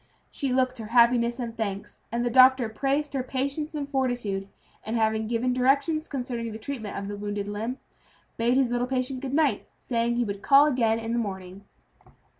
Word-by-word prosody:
She 275 -3 -2
looked 255 -1 +1
her 220 - -6
happiness 235 0 +4
and 235 -3 -5
thanks, 200 -3 -5
and 240 +1 -1
the 240 - 0
doctor 260 -1 +6
praised 280 +6 -1
her 270 - 0
patience 280 +4 -3
and 285 -2 -3
fortitude; 245 -8 -1 0.4
and 220 - -3
having 220 -1 +1
given 240 +2 0
directions 280 +5 +1
concerning 245 -4 -4
the 215 - -6
treatment 220 -3 -6
of 200 0 -4
the 205 - -5
wounded 205 0 -4
limb, 220 +5 -4 0.6
bade 235 +2 +2
his 260 -3 +2
little 245 0 0
patient 255 0 -1
good 270 0 -3
night, 305 -3 +1
saying 235 -1 -1
he 240 - +1
would 200 -1 -5
call 280 +5 +6
again 235 -6 +2
in 225 0 -4
the 240 - +1
morning. 190 -2 -6
240 Hz, 190 wpm, -26 LUFS, 220-265 Hz, 0.6 s, doctor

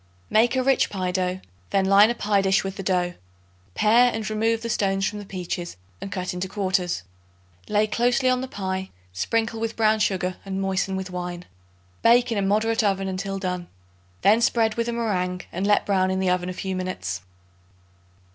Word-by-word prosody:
Make 235 +4 +4
a 260 - +2
rich 270 0 +3
pie 185 -2 -2
dough; 185 0 -1 0.3
then 195 -1 +2
line 200 +3 +6
a 240 - -1
pie 205 -3 +1
dish 195 +1 +2
with 195 0 -4
the - - -5
dough. 180 -2 0 0.6
Pare 240 +3 +5
and 220 -2 -4
remove 225 +1 0
the 230 - -3
stones 195 -1 +1
from 210 - -4
the 205 - -8
peaches 175 - -5 0.2
and 195 - -6
cut 185 -2 -3
into 180 +1 -3
quarters. 185 - -1 0.6
Lay 210 0 +2
closely 245 +4 +1
on 255 0 +2
the 260 - -4
pie; 190 -4 -4 0.2
sprinkle 225 - -1
with 225 0 -3
brown 220 -1 +3
sugar 185 -3 0
and 195 -1 -4
moisten 190 0 -1
with 190 -1 -4
wine. 180 -1 -5 0.6
Bake 240 +1 +5
in 215 - 0
a - - +1
moderate 215 +3 +1
oven 195 -1 +1
until 195 +1 -3
done. 180 -2 -3 0.6
Then 215 +4 +5
spread 225 -2 +2
with 230 +1 -2
a - - 0
meringue 185 -6 -1
and 190 +3 -2
let 205 - +3
brown 190 -2 +2
in 190 0 0
the 190 -1 +2
oven 180 0 0
a - - -4
few 190 +1 -4
minutes. 100 - -4
195 Hz, 195 wpm, -24 LUFS, 185-220 Hz, 0.6 s, line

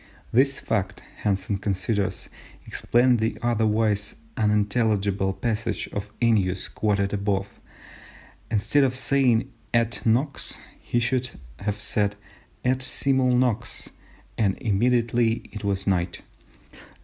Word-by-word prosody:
This 135 +3 +3
fact, 100 +1 -2
Hansen 100 -1 -1
considers, 100 +1 -1 0.4
explains 120 0 +2
the 110 +1 -1
otherwise 110 -3 +1 0.2
unintelligible 105 -2 +1
passage 115 +2 -2
of 100 0 -5
Ennius 100 -6 +2
quoted 100 -2 0
above: 100 -1 0 1.0
instead 115 +6 +3
of 130 -1 +1
saying 130 -1 +2 0.2
et 115 0 +2
nox, 130 +6 0 0.2
he 120 - 0
should 125 +1 0 0.3
have 105 +1 -3
said 105 -1 0 0.5
et 130 +1 +2
simul 130 0 +1
nox, 120 -2 -1 0.5
"and 100 -4 +2
immediately 115 +1 +1
it 105 -1 -7
was 100 -1 -1
night." 90 -2 0
110 Hz, 105 wpm, -25 LUFS, 100-120 Hz, 1.0 s, This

